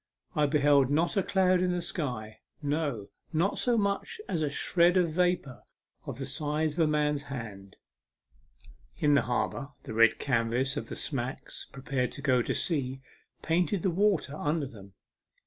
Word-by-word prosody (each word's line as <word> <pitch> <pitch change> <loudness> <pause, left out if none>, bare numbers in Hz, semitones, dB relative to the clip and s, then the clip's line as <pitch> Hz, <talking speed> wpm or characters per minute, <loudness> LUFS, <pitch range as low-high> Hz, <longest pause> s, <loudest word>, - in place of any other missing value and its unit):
I 150 -1 +3
beheld 145 -2 +4
not 160 +4 +1
a 195 - +3
cloud 185 -1 +2
in 180 -1 +1
the 180 - -1
sky 125 - -3 0.2
no, 145 -8 -2 0.2
not 170 +5 +1
so 245 -2 +2
much 205 - -1
as 170 -4 -1
a 150 - +1
shred 175 +5 +3
of 175 -2 +3
vapour 175 -6 0 0.5
of - - -5
the 135 - -4
size 150 +2 -1
of 165 - -7
a 160 - +4
man's 150 -1 +1
hand. 110 -9 -8 1.2
In 145 -1 +3
the 140 - +5
harbour 125 +3 -2
the - - -7
red 115 0 +5
canvas 125 +1 0
of 145 - -4
smacks 130 -2 -3
preparing 135 -2 -2
to - - -5
go 130 -4 +3
to - - -2
sea 135 -6 0 0.4
painted 170 +2 +1
the 190 - +2
water 185 -6 +1
under 150 0 -1
them. 100 -6 -12
145 Hz, 165 wpm, -29 LUFS, 130-170 Hz, 1.2 s, the